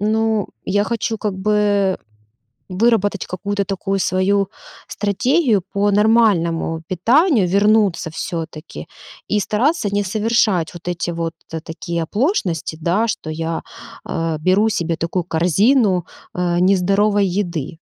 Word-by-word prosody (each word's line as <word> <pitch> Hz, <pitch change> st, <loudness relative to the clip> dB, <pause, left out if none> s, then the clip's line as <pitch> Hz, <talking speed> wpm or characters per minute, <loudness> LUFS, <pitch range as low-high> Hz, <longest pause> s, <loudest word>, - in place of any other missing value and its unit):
ну, 220 Hz, 0 st, +1 dB, 0.2 s
я 205 Hz, +2 st, +1 dB
хочу 230 Hz, -1 st, -2 dB
как 205 Hz, -3 st, -2 dB
бы 205 Hz, -1 st, +1 dB, 0.7 s
выработать 205 Hz, 0 st, +1 dB
какую-то 200 Hz, +2 st, -2 dB
такую 195 Hz, 0 st, -2 dB
свою 195 Hz, +2 st, +1 dB, 0.4 s
стратегию 225 Hz, -, +1 dB
по 205 Hz, 0 st, +2 dB
нормальному 195 Hz, -7 st, +2 dB
питанию. 235 Hz, -, +3 dB
Вернуться, 200 Hz, -2 st, +2 dB
всё-таки, 160 Hz, -1 st, -6 dB, 0.4 s
и 210 Hz, -, +1 dB
стараться 235 Hz, -, 0 dB
не 205 Hz, 0 st, +1 dB
совершать 210 Hz, -4 st, +1 dB
вот 175 Hz, 0 st, -11 dB
эти 175 Hz, 0 st, -2 dB
вот, 165 Hz, -1 st, -3 dB, 0.2 s
э, 160 Hz, -, -2 dB
такие 170 Hz, +1 st, -4 dB
оплошности, 200 Hz, -, -1 dB
да, 190 Hz, +8 st, +1 dB
что 180 Hz, -7 st, -4 dB
я, 165 Hz, +1 st, -3 dB, 0.5 s
э, 165 Hz, -1 st, -2 dB
беру 190 Hz, +6 st, +3 dB
себе 170 Hz, -6 st, -1 dB
такую 170 Hz, +2 st, -2 dB
корзину, 180 Hz, -, +2 dB, 0.3 s
э, 175 Hz, -1 st, 0 dB
нездоровой 195 Hz, +2 st, +3 dB
еды. 175 Hz, -5 st, -3 dB
195 Hz, 120 wpm, -19 LUFS, 175-210 Hz, 0.7 s, питанию